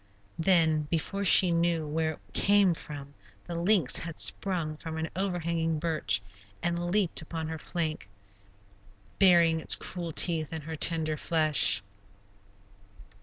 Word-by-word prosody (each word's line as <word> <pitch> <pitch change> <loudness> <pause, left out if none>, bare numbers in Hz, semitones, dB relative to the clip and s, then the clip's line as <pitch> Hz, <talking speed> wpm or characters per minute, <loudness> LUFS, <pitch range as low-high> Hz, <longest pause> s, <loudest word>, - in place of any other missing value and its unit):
Then, 160 -3 +3
before 195 +5 -3
she 185 -1 +8
knew 170 -1 0
where 160 +1 -2
it - - -16
came 200 -3 +3
from, 145 -3 -10 0.3
the 175 - -7
lynx 170 -3 +2
had 165 -2 -7
sprung 170 -6 +1
from 160 0 -7
an 160 0 -4
overhanging 170 -4 -2
birch, 155 - -1 0.4
and 175 0 -2
leaped 190 -3 0
upon 160 0 -6
her 160 -1 -6
flank, 155 - -5 1.1
burying 170 -4 +4
its - - +1
cruel 175 -2 -6
teeth 160 -1 +1
in 160 -1 -6
her 160 +2 -7
tender 155 -1 0
flesh. 155 - +1
165 Hz, 130 wpm, -28 LUFS, 155-175 Hz, 1.1 s, she